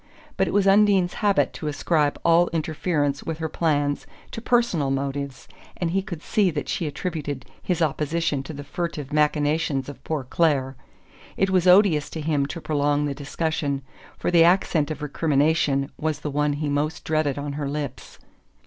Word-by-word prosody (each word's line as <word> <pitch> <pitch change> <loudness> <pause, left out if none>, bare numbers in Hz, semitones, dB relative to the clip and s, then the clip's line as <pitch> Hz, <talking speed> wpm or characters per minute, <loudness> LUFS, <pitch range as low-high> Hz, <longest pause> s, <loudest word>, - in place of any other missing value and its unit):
But - - +1
it - - -2
was 205 -1 +2
Undine's 195 -2 +4
habit 205 -2 +2
to 155 - -6
ascribe 150 0 0
all 170 +1 +5
interference 155 -3 -1
with 165 -1 -4
her 160 0 -2
plans 145 -3 0 0.2
to 225 - -6
personal 235 - +1
motives, 140 0 -3 0.3
and 170 -2 -1
he 195 +2 +1
could 175 -4 -7
see 205 -3 +2
that 150 -3 -4
she 165 - -2
attributed 145 -4 -4 0.2
his 175 -2 0
opposition 150 -1 0
to 135 +3 -8
the 145 0 -7
furtive 150 -2 -4
machinations 150 -2 +1
of 135 -1 -11
poor 155 -4 -2
Clare. 135 -1 +1 0.6
It 195 0 +2
was 185 -1 +3
odious 180 -5 +5
to 160 - -6
him 150 -2 0
to 170 - -6
prolong 145 -1 0
the 145 - -2
discussion, 145 0 -2 0.3
for - - -1
the 170 -2 +6
accent 170 -3 +3
of 150 -1 -5
recrimination 145 -1 +1
was 155 -1 -2
the 150 - -3
one 150 +1 +1
he 145 +1 -3
most 150 +3 -1
dreaded 155 -3 0
on 145 0 -4
her 145 -1 -3
lips. 145 -3 -5
150 Hz, 175 wpm, -24 LUFS, 145-170 Hz, 0.6 s, the